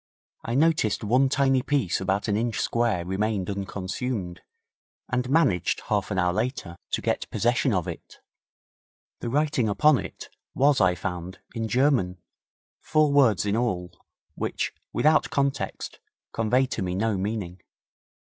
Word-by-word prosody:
I 115 - -2
noticed 150 -9 +2
one 125 +5 +3
tiny 135 -1 +2
piece 135 - 0
about 95 +3 0
an 105 - +1
inch 115 +1 -1
square 115 -7 0
remained 100 +1 -1
unconsumed, 100 0 -4 0.7
and 125 -1 -1
managed, 135 - +2
half 105 -2 0
an 100 - -2
hour 90 -1 +2
later, 110 -5 -3 0.2
to - - +1
get - - -1
possession 120 +3 +1
of 90 -5 0
it. - - -8 1.0
The 120 - -4
writing 145 -4 +1
upon 150 +7 +4
it - - -8 0.3
was, 140 -2 +4
I 90 -1 +4
found, 90 0 -5 0.2
in 115 -2 -2
German, 125 -8 +2 0.6
four 155 -2 +2
words 125 -9 +4
in 100 0 +1
all, 95 -7 -1 0.4
which, - - -3 0.2
without 155 +1 +3
context, 140 -2 -2 0.3
conveyed 125 +4 +1
to - - -2
me 90 -1 -2
no 110 +2 0
meaning. 95 -2 -3
110 Hz, 140 wpm, -26 LUFS, 95-130 Hz, 1.0 s, upon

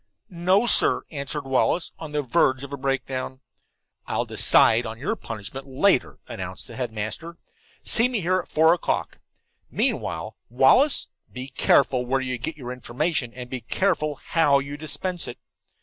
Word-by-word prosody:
"No, 185 +5 +2
sir," 235 - +5
answered 145 -1 -5
Wallace, 135 +6 +1
on 160 -2 -7
the 150 -1 -1
verge 130 -1 +2
of 140 0 -8
a - - -1
breakdown. 135 -1 -3 0.7
"I'll - - -1
decide 115 +2 +4
upon 110 0 -6
your 145 - -2
punishment 115 - -7
later," 130 - +1
announced - - -6
the - - -11
headmaster. 120 +8 -5 0.5
"See 230 +2 +3
me 245 -4 -1
here 185 +2 +1
at - - -7
four 160 +2 +4
o'clock. 175 - -2 0.5
Meanwhile, - - -1
Wallace, 135 - +4 0.2
be 130 +1 -7
careful 130 -1 +3
where 135 +2 +1
you 125 -2 -3
get 150 +7 -4
information, 125 +2 -2
and 125 -1 -7
be 125 0 -6
careful 155 - 0
how 145 -1 +2
you 140 +1 -4
dispense 170 +3 -4
it." 120 - -7
140 Hz, 150 wpm, -24 LUFS, 125-165 Hz, 0.7 s, sir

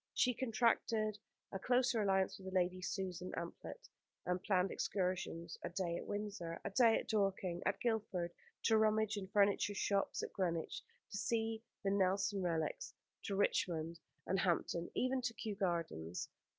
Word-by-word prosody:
She 250 - +4
contracted 225 -3 +1 0.3
a 195 - -3
closer 245 0 +3
alliance 190 -1 +2
with 190 0 -7
Lady 185 0 +2
Susan 185 -1 -3
Amphlett, 465 - -6 0.4
and 180 0 0
planned 185 -2 +2
excursions: 180 -3 -2
a - - -2
day 175 -3 -1
at - - -5
Windsor, 205 -5 -3
a - - -2
day 230 +1 +6
at - - -4
Dorking, 195 -4 +1
at 190 - 0
Guildford, 205 -7 0 0.3
to 220 -1 +5
rummage 220 0 +3
in 200 -2 -4
furniture 200 +1 +3
shops, 200 0 +1
at - - -5
Greenwich 170 -4 -1 0.3
to 200 - -3
see 225 +1 0 0.2
the 195 - +2
Nelson 195 0 +2
relics, 175 - -1 0.3
to 200 - -1
Richmond 165 -4 +1 0.3
and 190 - +1
Hampton, 170 -1 +1
even 255 +1 +1
to 235 -2 -2
Kew 215 - -3
Gardens. 165 - -2
195 Hz, 150 wpm, -38 LUFS, 180-220 Hz, 0.4 s, day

